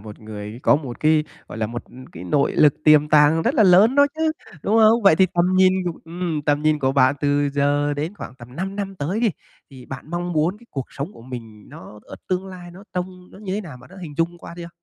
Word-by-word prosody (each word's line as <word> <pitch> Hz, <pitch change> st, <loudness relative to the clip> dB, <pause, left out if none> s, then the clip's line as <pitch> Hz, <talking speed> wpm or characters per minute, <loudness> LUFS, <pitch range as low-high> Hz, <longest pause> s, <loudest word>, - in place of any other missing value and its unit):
một 105 Hz, 0 st, -11 dB
người 105 Hz, +1 st, -8 dB
có -, -, +5 dB
một 135 Hz, -5 st, -7 dB
cái, 155 Hz, 0 st, +3 dB, 0.2 s
gọi 110 Hz, -, -8 dB
là, 110 Hz, -, -1 dB
một 120 Hz, +2 st, -6 dB, 0.3 s
cái 85 Hz, +1 st, -9 dB
nội 140 Hz, +10 st, +1 dB
lực 150 Hz, -2 st, +4 dB
tiềm 150 Hz, -1 st, +5 dB
tàng 150 Hz, +2 st, +4 dB
rất 265 Hz, -, 0 dB
là 225 Hz, -, +4 dB
lớn 195 Hz, +6 st, +6 dB
đó 285 Hz, 0 st, +6 dB
chứ, 315 Hz, 0 st, 0 dB, 0.3 s
đúng 220 Hz, +3 st, +2 dB
không? 225 Hz, +1 st, +5 dB
Vậy 195 Hz, -6 st, +6 dB
thì 190 Hz, -, +5 dB
tầm 175 Hz, -, +3 dB
nhìn 185 Hz, 0 st, +5 dB
cua 175 Hz, -2 st, -4 dB
ừm, 165 Hz, -2 st, -4 dB
tầm 145 Hz, 0 st, 0 dB
nhìn 155 Hz, -1 st, +2 dB
của 135 Hz, -1 st, 0 dB
bạn 130 Hz, 0 st, +4 dB
từ 145 Hz, 0 st, +1 dB
giờ 145 Hz, +1 st, +1 dB
đến 155 Hz, +6 st, -4 dB
khoảng 130 Hz, -, -9 dB
tầm 125 Hz, +1 st, -14 dB
5 195 Hz, +3 st, -4 dB
năm 195 Hz, -1 st, -4 dB
tới 175 Hz, +9 st, -2 dB
đi, 230 Hz, -4 st, +2 dB, 0.4 s
thì 130 Hz, -2 st, -13 dB
bạn 135 Hz, +4 st, -9 dB
mong 175 Hz, 0 st, -3 dB
muốn 165 Hz, +6 st, 0 dB
cái 235 Hz, -, -20 dB
cuộc 135 Hz, -3 st, -5 dB
sống 145 Hz, +9 st, -6 dB
của 115 Hz, -, -15 dB
mình 115 Hz, -4 st, -10 dB
nó 105 Hz, +3 st, -12 dB
ở -, -, -11 dB
tương 185 Hz, +1 st, -1 dB
lai 180 Hz, -2 st, -10 dB
nó 190 Hz, +4 st, -14 dB
trông 180 Hz, 0 st, -5 dB
nó -, -, -14 dB
như 195 Hz, -2 st, -5 dB
thế 210 Hz, -, -2 dB
nào, 160 Hz, -10 st, -10 dB
bạn 130 Hz, -, -17 dB
đã 190 Hz, -, -14 dB
hình 150 Hz, -3 st, -8 dB
dung 170 Hz, +1 st, -1 dB
qua 170 Hz, -, -10 dB
chưa? 170 Hz, -1 st, -8 dB
155 Hz, 260 wpm, -21 LUFS, 140-185 Hz, 0.4 s, lớn